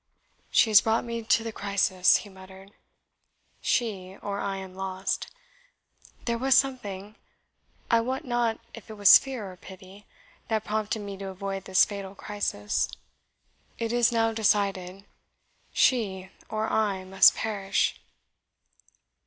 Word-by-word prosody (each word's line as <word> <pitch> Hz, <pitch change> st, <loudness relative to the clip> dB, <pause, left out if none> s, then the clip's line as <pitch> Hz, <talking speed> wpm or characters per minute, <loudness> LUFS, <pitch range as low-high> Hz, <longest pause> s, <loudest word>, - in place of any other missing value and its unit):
"She 225 Hz, -, +4 dB
has 210 Hz, -, +8 dB
brought 225 Hz, +1 st, 0 dB
me 235 Hz, -1 st, -4 dB
to 225 Hz, 0 st, +2 dB
the 225 Hz, -, -4 dB
crisis," 195 Hz, -3 st, +2 dB
he -, -, -11 dB
muttered 190 Hz, +1 st, -14 dB, 0.9 s
"she 195 Hz, -5 st, -2 dB
or 200 Hz, 0 st, -3 dB
I 195 Hz, -1 st, -2 dB
am 190 Hz, -1 st, -8 dB
lost. 190 Hz, 0 st, -3 dB, 1.0 s
There 235 Hz, -1 st, -1 dB
was 265 Hz, 0 st, +3 dB
something 210 Hz, -6 st, -1 dB, 0.7 s
I 230 Hz, -, +5 dB
wot 260 Hz, +6 st, -3 dB
not 240 Hz, -2 st, 0 dB
if 225 Hz, -2 st, -12 dB
it 220 Hz, -, -8 dB
was 205 Hz, -2 st, +8 dB
fear 245 Hz, -8 st, -6 dB
or 180 Hz, -, -14 dB
pity 190 Hz, +2 st, -14 dB, 0.4 s
that 220 Hz, -1 st, -1 dB
prompted 215 Hz, 0 st, -2 dB
me 200 Hz, -1 st, -7 dB
to 195 Hz, 0 st, -7 dB
avoid 195 Hz, 0 st, -5 dB
this 190 Hz, 0 st, +5 dB
fatal 200 Hz, -1 st, -7 dB
crisis. 200 Hz, -, -2 dB, 0.9 s
It 230 Hz, 0 st, -3 dB
is 240 Hz, -1 st, +3 dB
now 225 Hz, -1 st, +1 dB
decided 195 Hz, -3 st, 0 dB, 0.7 s
she 190 Hz, -7 st, +1 dB, 0.2 s
or 215 Hz, 0 st, -2 dB
I 200 Hz, -4 st, 0 dB
must 190 Hz, +1 st, +5 dB
PERISH." 200 Hz, -3 st, -1 dB
205 Hz, 135 wpm, -27 LUFS, 190-225 Hz, 1.0 s, has